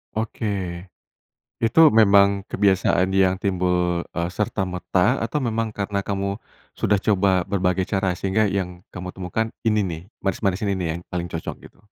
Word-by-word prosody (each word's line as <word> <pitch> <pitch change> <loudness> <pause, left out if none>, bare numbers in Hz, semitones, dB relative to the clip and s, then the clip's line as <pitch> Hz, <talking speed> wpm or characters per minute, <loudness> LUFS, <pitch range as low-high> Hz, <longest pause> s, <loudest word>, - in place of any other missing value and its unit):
Oke. 100 -5 -3 0.7
Itu, 150 +8 +5
memang 100 -2 +4
kebiasaan 95 -1 +2
yang 95 -1 +3
timbul, 90 -2 0
eee, 85 0 -1
serta-merta, 95 +2 0
atau 125 +6 -2
memang, 115 -2 -2
karena 100 0 -2
kamu 100 0 -3 0.3
sudah 105 - +1
coba 95 -3 +3
berbagai 95 -1 0
cara, 95 -2 -1
sehingga, 100 +3 +1
yang 90 -3 -3 0.2
kamu 90 0 -5
temukan 95 +5 -2 0.2
ini 105 -2 +3
nih, 85 -3 -4 0.2
manis-manis 95 +1 0
ini 100 -1 +1
nih, 90 - -1
yang 85 - -7
paling 90 -1 -2
cocok, 85 -2 -5
gitu? - - -28
95 Hz, 145 wpm, -23 LUFS, 90-105 Hz, 0.7 s, Itu